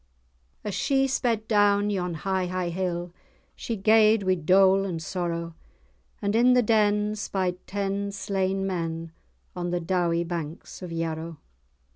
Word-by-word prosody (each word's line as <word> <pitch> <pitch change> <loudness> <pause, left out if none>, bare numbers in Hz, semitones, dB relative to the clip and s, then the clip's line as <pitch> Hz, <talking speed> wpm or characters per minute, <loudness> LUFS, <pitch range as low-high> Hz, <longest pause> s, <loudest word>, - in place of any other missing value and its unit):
As 210 - -4
she 270 +5 +2
sped 235 -5 0
down 205 -1 +3
yon 180 -3 -2
high, 190 +2 -1
high 180 -1 -2
hill, 175 -1 -3 0.4
She 230 - -4
gaed 215 +1 +4
wi' 185 0 +3
dole 190 +3 +4
and 180 -4 -3
sorrow, 170 0 -3 0.7
And 200 +1 0
in 245 +2 +5
the 250 -1 +4
den 210 -1 +2
spied 185 -3 -2
ten 200 0 -2
slain 195 -1 -1
men, 165 -3 -3 0.4
On 175 -1 -3
the 175 0 0
dowie 170 -1 0
banks 170 0 -6
of 180 -2 -7
Yarrow. 165 0 -4
190 Hz, 140 wpm, -26 LUFS, 170-205 Hz, 0.7 s, in